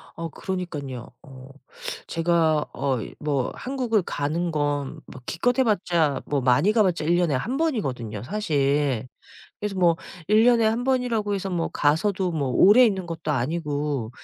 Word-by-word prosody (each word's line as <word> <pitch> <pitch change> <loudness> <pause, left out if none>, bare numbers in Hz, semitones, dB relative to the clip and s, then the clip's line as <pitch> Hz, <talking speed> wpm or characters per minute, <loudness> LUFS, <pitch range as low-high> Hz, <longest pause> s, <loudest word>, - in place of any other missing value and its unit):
어 165 0 -5
그러니깐요. 145 -9 -5
어 130 -1 -13 0.6
제가 165 -2 +2
어이 130 -5 -2
뭐 140 -4 -1
한국을 250 -5 -1
가는 165 +3 -2
건 145 -2 +1 0.4
뭐 130 - -12
기껏 245 +10 0
해 - - +6
봤자 175 - +1
뭐 145 -2 -1
많이 130 +11 +3
가 215 -1 +4
봤자 180 -5 0
1 170 +2 +3
년에 175 -4 +2
1 240 - -2
번이거든요 130 - -2
사실. 140 - 0 0.5
그래서 205 -1 -3
뭐 170 -2 +4 0.3
1 215 +2 +5
년에 235 -2 +5
1 225 +3 0
번이라고 245 -6 0
해서 195 -1 -3
뭐 170 -2 -1
가서도 180 +5 +1
뭐 145 -4 -1
오래 205 - +7
있는 190 -6 0
것도 165 -2 -4
아니고 145 -3 -2
165 Hz, 275 characters per minute, -24 LUFS, 145-210 Hz, 0.6 s, 오래